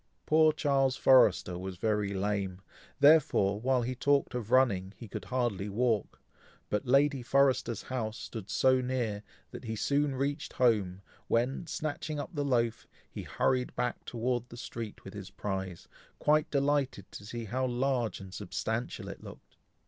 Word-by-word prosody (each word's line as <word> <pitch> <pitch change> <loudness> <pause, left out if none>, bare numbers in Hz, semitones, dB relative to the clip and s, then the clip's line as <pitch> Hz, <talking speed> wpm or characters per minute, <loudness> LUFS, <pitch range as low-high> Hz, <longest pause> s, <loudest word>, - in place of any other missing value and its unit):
Poor 155 0 +5
Charles 135 -3 +1
Forrester 95 -8 +4
was 95 -1 -6
very 105 0 0
lame, 100 -1 -2 0.4
therefore, 140 -9 +4
while 130 0 +2
he 125 +2 -2
talked 140 +2 +1
of 120 -3 -4
running 105 -7 +2
he 115 - -9
could 100 -1 -7
hardly 110 -4 -1
walk, 110 0 0 0.5
but 105 +2 -1
Lady 140 +1 +3
Forrester's 130 -3 +2
house 115 -4 -3
stood 110 -4 -7
so 130 +5 +3
near, 120 -5 -2 0.3
that - - -9
he 110 0 -3
soon 140 +5 +1
reached 140 +1 -2
home, 100 -7 +1 0.2
when, 125 +8 0
snatching 155 -1 -3
up 145 - -5
the 145 -3 -1
loaf, 120 -4 0 0.2
he - - -6
hurried 125 -1 0
back 125 -1 -2
towards 120 0 -2
the 120 - -11
street 115 -3 -7
with 95 - -10
his 100 -2 -8
prize, 95 -3 -5 0.3
quite 155 +1 +2
delighted 140 -7 0
to - - -9
see 115 +2 -6
how 130 +5 -1
large 125 -2 0
and 95 -1 -10
substantial 110 +4 -4
it - - -8
looked. - - -13
120 Hz, 155 wpm, -30 LUFS, 105-135 Hz, 0.5 s, Poor